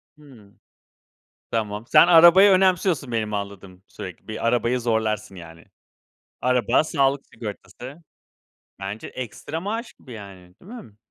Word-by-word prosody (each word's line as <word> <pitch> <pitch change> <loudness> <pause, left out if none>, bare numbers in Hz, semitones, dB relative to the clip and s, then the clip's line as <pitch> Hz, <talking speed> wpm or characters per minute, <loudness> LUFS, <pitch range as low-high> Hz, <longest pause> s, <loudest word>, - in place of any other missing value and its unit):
Hımm. 125 -9 -19 0.9
Tamam, 105 -1 -3
sen - - +6
arabayı 175 +4 +7
önemsiyorsun 185 -7 +2
benim 110 -2 -2
anladığım, 100 -2 -7
sürekli, 90 -3 -10
bir 110 +1 -5
arabayı 120 +1 +1
zorlarsın, 110 -4 -2
yani. 85 -1 -13 0.8
Araba, 125 +4 +2
sağlık 140 -2 0
sigortası. 120 - -10 0.8
Bence 100 +3 -6
ekstra 135 +6 -7
maaş 225 +5 -5
gibi, 130 - -15
yani, 95 -4 -12
değil 205 +7 -14
mi? 115 - -12
115 Hz, 120 wpm, -23 LUFS, 100-150 Hz, 0.9 s, arabayı